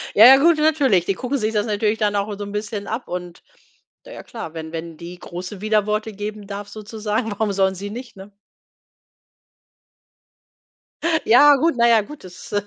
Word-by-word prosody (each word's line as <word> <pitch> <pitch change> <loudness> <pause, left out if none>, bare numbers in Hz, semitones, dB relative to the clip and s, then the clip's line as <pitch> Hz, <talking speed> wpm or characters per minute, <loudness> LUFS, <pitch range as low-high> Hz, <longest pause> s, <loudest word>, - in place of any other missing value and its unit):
Ja, 215 - +9
ja 265 +1 +9
gut, 330 +3 +4
natürlich. 285 - +2
Die 195 - 0
gucken 255 +7 -3
sich 220 -1 -2
das 210 0 0
natürlich 210 0 0
dann 210 -2 0
auch 205 +1 -1
so 205 - -5
'n 200 - -8
bisschen 210 0 -5
ab 230 +3 -4
und 180 -1 -7 0.6
na - - -12
ja - - -10
klar, 225 -9 -8
wenn 160 -1 -7
wenn 165 -1 -6
die 175 +2 -9
Große 180 +3 -8
Widerworte 215 0 0
geben 205 0 -7
darf 200 0 -7
sozusagen, 215 +1 -4
warum 205 0 -1
sollen 190 -1 +1
sie 200 +2 -6
nicht, 240 +3 -9
ne? 195 +2 -12 2.9
Ja 285 +5 +7
gut, 325 +4 +1
na 235 0 +4
ja 230 -2 +5
gut, 290 +5 -12
das 180 +2 -12
210 Hz, 180 wpm, -21 LUFS, 195-230 Hz, 2.9 s, Ja